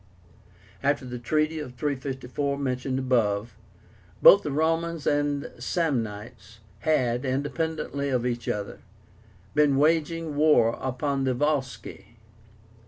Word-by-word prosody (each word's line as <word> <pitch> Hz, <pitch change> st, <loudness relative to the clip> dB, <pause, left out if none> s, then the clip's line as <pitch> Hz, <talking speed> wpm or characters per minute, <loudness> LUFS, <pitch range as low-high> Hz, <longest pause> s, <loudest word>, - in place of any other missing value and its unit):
After 140 Hz, -1 st, 0 dB
the 125 Hz, -1 st, -6 dB
treaty 155 Hz, +5 st, 0 dB
of 125 Hz, -4 st, -7 dB
354 140 Hz, 0 st, -3 dB
mentioned 130 Hz, -1 st, -2 dB
above, 115 Hz, -5 st, 0 dB, 0.6 s
both 200 Hz, -, +8 dB
the 150 Hz, -, -4 dB
Romans 165 Hz, +2 st, 0 dB
and 145 Hz, -1 st, 0 dB
Samnites 120 Hz, -, -3 dB, 0.2 s
had, 125 Hz, -4 st, +1 dB
independently 140 Hz, +1 st, -2 dB
of 125 Hz, -2 st, 0 dB
each 120 Hz, -2 st, -3 dB
other, 105 Hz, -1 st, -4 dB, 0.7 s
been 145 Hz, -2 st, +3 dB
waging 160 Hz, +1 st, +1 dB
war 145 Hz, -6 st, +5 dB
upon 135 Hz, +1 st, -1 dB
the 130 Hz, -1 st, +1 dB
Volsci. 130 Hz, -6 st, -3 dB
140 Hz, 105 wpm, -26 LUFS, 125-150 Hz, 0.7 s, both